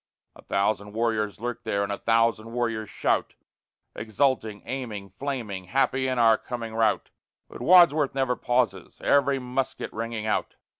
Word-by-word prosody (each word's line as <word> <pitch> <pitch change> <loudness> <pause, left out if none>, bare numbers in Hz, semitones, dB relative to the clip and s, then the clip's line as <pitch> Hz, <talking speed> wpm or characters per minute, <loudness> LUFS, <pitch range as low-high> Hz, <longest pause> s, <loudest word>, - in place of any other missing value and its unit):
A - - -14
thousand 105 +1 -1
warriors 110 -3 -1
lurk 120 +1 -4
there, 100 0 0
and 100 - -3
a 100 - -2
thousand 115 0 +1
warriors 115 -3 -2
shout, - - -1 0.6
Exulting, 110 -2 -1
aiming, 115 -6 -5
flaming, 105 -4 -5
happy 130 +4 +1
in 130 -1 -1
our 115 -2 +5
coming 115 -2 -6
rout; 110 -1 +1 0.4
But - - -11
Wadsworth 155 -3 +5
never 130 -2 +1
pauses, 120 -7 -1
every 140 -1 +3
musket 130 +1 -3
ringing 115 -1 -4
out. 110 - -1
115 Hz, 145 wpm, -26 LUFS, 105-130 Hz, 0.6 s, our